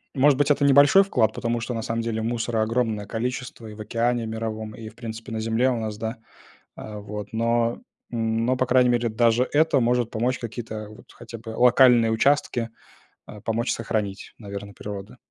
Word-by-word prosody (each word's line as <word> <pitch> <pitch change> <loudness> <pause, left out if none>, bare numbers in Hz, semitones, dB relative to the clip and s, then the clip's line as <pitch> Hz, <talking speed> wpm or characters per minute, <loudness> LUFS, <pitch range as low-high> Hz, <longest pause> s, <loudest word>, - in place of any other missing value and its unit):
Может 135 0 +4
быть, 145 - +3
это 145 -1 +3
небольшой 140 +7 +7
вклад, 115 - +1
потому 115 0 -2
что 120 +2 -4
на 115 - -2
самом 115 +1 -2
деле 115 -1 -2
мусора 115 -1 -1
огромное 110 -2 -1
количество 120 +1 -4
и 105 - -9
в 105 - -9
океане 120 +2 0
мировом, 110 -1 -4
и, 110 -1 -8
в - - -20
принципе, 115 0 -8
на 110 - -3
земле 115 +3 +1
у 125 - 0
нас, 110 -1 -4
да, 110 +2 -4 0.6
а, 105 -1 -8
вот. 105 0 -7
Но 115 +1 +1 0.3
но, 115 +2 0
по 130 - +1
крайней 125 -1 +4
мере, 120 -1 +1
даже 115 +2 +2
это 155 -2 +4
может 120 -1 +1
помочь 120 +3 -1
какие-то, 110 -2 -6
вот, 105 - -14
хотя 115 -1 -10
бы 115 +1 -12
локальные 125 -2 +6
участки, 120 -1 +1 0.6
а, 105 - -10
помочь 115 +4 -1
сохранить, 105 -3 -3
наверно, 100 -1 -8
природу. 105 +4 -8
115 Hz, 185 wpm, -24 LUFS, 110-125 Hz, 0.6 s, небольшой